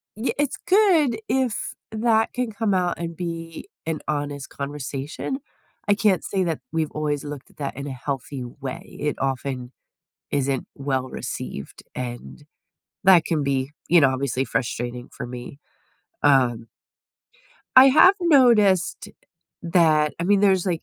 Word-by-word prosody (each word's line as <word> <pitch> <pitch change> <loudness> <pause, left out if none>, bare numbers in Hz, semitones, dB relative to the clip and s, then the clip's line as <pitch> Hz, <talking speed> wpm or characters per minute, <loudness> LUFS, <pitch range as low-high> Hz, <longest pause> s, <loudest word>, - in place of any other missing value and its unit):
ye 220 +5 -1
it's 290 -2 0
good 355 - +4
if 235 -3 0 0.2
that 220 0 +2
can 250 -3 -2
come 210 -1 0
out 180 -1 0
and 170 -1 -4
be 165 - -6 0.2
an 160 -2 -1
honest 145 -2 -3
conversation. 145 - -5 0.5
I 205 - +5
can't 205 -3 +2
say 190 -2 -1
that 165 -3 -2
we've 160 -1 -1
always 150 -2 -2
looked 145 -2 -8
at - - -28
that 140 -3 -4
in 140 - -5
a 135 - -4
healthy 135 0 -5
way. 130 +2 -8
It 150 -1 -1
often 130 -2 -3 0.6
isn't 135 -2 -1
well-received, 130 - -4
and 120 - -7 0.6
that 180 -4 +6
can 160 -3 0
be, 135 0 -1 0.2
you 175 -1 +6
know, 140 - +5
obviously 130 0 -1
frustrating 120 0 -3
for - - -6
me, 125 +3 -8 0.6
um 125 -5 +3 1.1
I 260 +1 +11
have 310 +8 +7
noticed 235 - +4 0.5
that 160 -3 +3
I - - -1
mean, 200 +2 +3
there's, 195 -2 +3
like, 170 -3 -1
155 Hz, 140 wpm, -23 LUFS, 135-200 Hz, 1.1 s, I